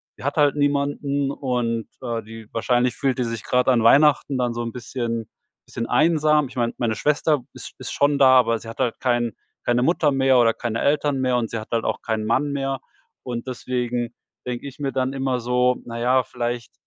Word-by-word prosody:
sie - - -13
hat 140 +3 -2
halt 145 -2 +4
niemanden 145 -1 0
und, 120 -5 -2
äh, 115 -3 -3
die 110 0 -11
wahrscheinlich 120 +1 +1
fühlt 135 -2 0
die - - +2
sich 115 -2 -4
grad 125 0 +1
an 125 -3 +4
Weihnachten 140 +2 +4
dann 125 -2 0
so 120 - -3
'n 115 - -4
bisschen 115 -2 -4 0.4
bisschen 115 -1 -5
einsam.“ 150 -2 +3
Ich 130 - -14
meine, 120 -2 0
meine 115 -2 0
Schwester 150 +4 +1
ist - - -10
ist - - -6
schon 145 0 +2
da, 130 -2 +7
aber 115 -2 +1
sie 115 - -10
hat 115 - -10
halt 125 -3 0
kein 120 -2 +1 0.3
keine 120 0 +2
Mutter 155 -1 +2
mehr 135 -1 +4
oder 115 -1 +4
keine 115 -1 -3
Eltern 145 -1 +1
mehr, 130 -1 +1
und 120 -2 0
sie 115 - -4
hat 110 - -10
halt 115 - +1
auch - - -2
keinen 110 -2 -2
Mann 140 +6 +1
mehr. 135 -1 -2 0.5
Und 120 -1 -5
deswegen 125 -1 -3 0.3
denke 125 +2 -4
ich 140 - -10
mir 140 -2 -2
dann 130 0 -1
immer 135 -2 -1
so: 125 +1 +2
„Na 115 0 -6
ja, 125 +2 +3
vielleicht 120 -1 -4
125 Hz, 210 wpm, -23 LUFS, 115-140 Hz, 0.5 s, da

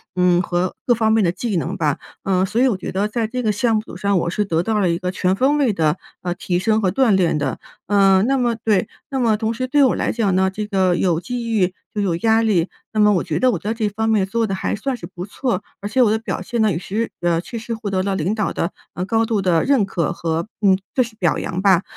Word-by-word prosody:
嗯 180 -1 +3
和 180 0 -1
各 245 - +4
方 220 -1 +1
面 220 -2 +3
的 170 - +2
技 205 +3 -3
能 180 +5 -2
吧。 150 -5 0 0.3
呃 190 -1 +2
所 220 +5 0
以 265 - +5
我 230 - +1
觉 - - -6
得 200 +2 0
在 220 +1 -2
这 250 +2 -3
个 215 - +1
项 220 +2 +1
目 215 - -6
上 200 -1 +1
我 170 - -1
是 210 +4 0
得 165 -3 0
到 220 +1 0
了 185 -4 +2
一 170 - +1
个 180 0 -2
全 185 0 0
方 275 +6 +2
位 270 -6 +2
的， 160 -1 +1 0.2
呃， 175 -1 -2
提 175 0 -1
升 220 +3 +1
和 185 -2 +1
锻 265 -4 +3
炼 175 -5 +2
的。 145 - -2 0.3
呃 195 -1 +4
那 270 +3 +2
么 240 -2 +1
对， 220 -3 +1 0.2
那 270 - -2
么 225 -4 +2
同 220 +1 -1
时 255 +2 -3
对 285 +2 +4
我 260 - +3
来 - - 0
讲 210 -5 0
呢， 190 0 +3
这 210 +2 -4
个 190 -3 +1
有 175 -3 +1
机 235 +3 -4
遇 185 -4 +1 0.2
就 210 - -1
有 180 -4 0
压 225 +3 +3
力， 190 -6 +2 0.3
那 215 - -1
么 210 0 +5
我 180 - +1
觉 160 -3 -2
得 255 -1 +4
我 180 - -2
在 210 +5 -2
这 225 -1 -1
一 - - +1
方 220 +2 -2
面 210 -3 +3
做 225 +3 -1
得 195 - -2
还 - - -2
算 255 +5 -3
是 180 - -8
不 180 -1 -8
错， 245 +4 -2 0.2
而 205 - -3
且 255 +4 +1
我 225 - +5
的 220 - +2
表 225 - -4
现 240 -3 -3
呢， 215 - +3
也 165 - -1
是 215 +5 -3
呃 170 -1 +2
确 230 +6 -7
实 230 +1 -5
获 220 -2 -5
得 185 -1 +1
了 195 0 -1
领 185 +3 0
导 210 -2 -1
的 170 - -2 0.2
呃 180 - -2
高 225 +3 +1
度 225 -2 0
的 175 -4 +2
认 270 -7 +3
可 175 -5 -1
和 165 +2 -2
嗯 195 -3 +4 0.2
就 255 - +4
是 230 -2 -10
表 170 -6 +1
扬 180 - -3
吧。 190 -2 +4
205 Hz, 300 characters per minute, -20 LUFS, 180-225 Hz, 0.3 s, 以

